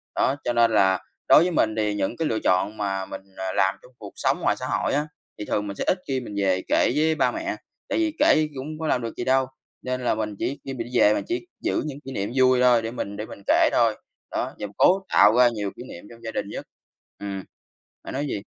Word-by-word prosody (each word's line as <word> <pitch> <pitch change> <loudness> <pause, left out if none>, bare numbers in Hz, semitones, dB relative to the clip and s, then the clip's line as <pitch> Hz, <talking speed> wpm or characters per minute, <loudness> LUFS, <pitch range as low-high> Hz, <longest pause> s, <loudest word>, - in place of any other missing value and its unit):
Đó, 135 - +2
cho 120 - 0
nên 115 -1 +4
là 95 -3 +3 0.3
đối - - +8
với 180 +1 +1
mình 110 -8 +1
thì 105 -1 +1
những 105 +4 -2
cái 160 - 0
lựa 110 - -1
chọn 95 +4 +1
mà 95 -2 -2
mình, - - -8 0.2
ờ, 95 0 -3
làm 95 +2 +2
trong 125 - -18
cuộc 100 -2 -10
sống - - 0
ngoài - - +2
xã - - -4
hội - - 0
á, 150 +2 0 0.3
thì 105 - -4
thường 105 0 -1
mình 100 - -5
sẽ - - -3
ít 185 - +2
khi 135 -1 0
mình 105 -5 -8
về 95 -1 +2
kể - - +3
với 160 +1 +2
ba - - +2
mẹ. 330 +1 -3 0.3
Tại - - 0
vì 320 -1 +1
kể 155 - +4
cũng 155 +4 -6
có 160 - -2
làm 125 - +1
được 115 - -4
gì - - -2
đâu, 130 +1 +3 0.4
nên 125 0 -3
là 120 - +1
mình 105 -2 -3
chỉ 140 - -2
khi 135 - -4
mình 120 -2 -5
đi - - +3
về 105 - +6
mình - - -1
chỉ 355 0 -2 0.2
giữ 345 - 0
những 145 -2 -6
kỷ 135 - -6
niệm 100 -2 -3
vui 130 -1 +4
thôi 120 -2 +5
để 115 0 -4
mình 100 -4 -5
để 105 - -4
mình 100 - -11
kể - - +5
thôi. - - +3 0.4
Đó, - - -2
và 105 - -3
cố 190 +2 +5
tạo 105 +3 +6
ra 125 -1 +7
nhiều 105 -4 -4
kỷ - - -9
niệm 85 - -10
trong 115 0 -15
gia 115 - -4
đình - - -3
nhất. - - -7 0.5
Ừm, 100 -1 -5 0.6
bạn - - -7
nói 140 +2 -2
gì? 100 - -3
120 Hz, 265 wpm, -24 LUFS, 105-135 Hz, 0.6 s, đối